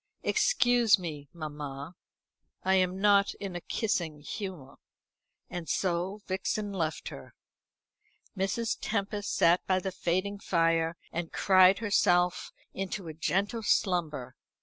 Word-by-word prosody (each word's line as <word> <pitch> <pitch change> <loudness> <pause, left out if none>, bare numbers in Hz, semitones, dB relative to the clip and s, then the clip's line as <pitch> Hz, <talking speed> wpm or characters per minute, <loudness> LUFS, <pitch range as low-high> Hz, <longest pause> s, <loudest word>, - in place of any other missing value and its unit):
"Excuse 245 - +4
me, 150 -6 -7
mamma; 150 -1 -7 0.7
I 190 - +2
am 185 0 +2
not 200 0 +4
in 195 -3 -6
a 175 - -4
kissing 170 -9 -1
humour." 155 -4 -7 0.7
And 175 -2 -6
so 185 +3 -1
Vixen 200 +2 -2
left 160 -4 -2
her. - - -11 1.0
Mrs. 195 +4 -1
Tempest 205 -1 -2
sat 170 +2 +4
by 185 - +3
the 190 +1 -2
fading 185 +3 -1
fire, 165 -2 +1
and 165 0 -4
cried 190 0 +5
herself 180 -5 +2 0.2
into 195 -1 -4
a - - -6
gentle 200 +8 -1
slumber. 175 - 0
185 Hz, 120 wpm, -29 LUFS, 165-200 Hz, 1.0 s, cried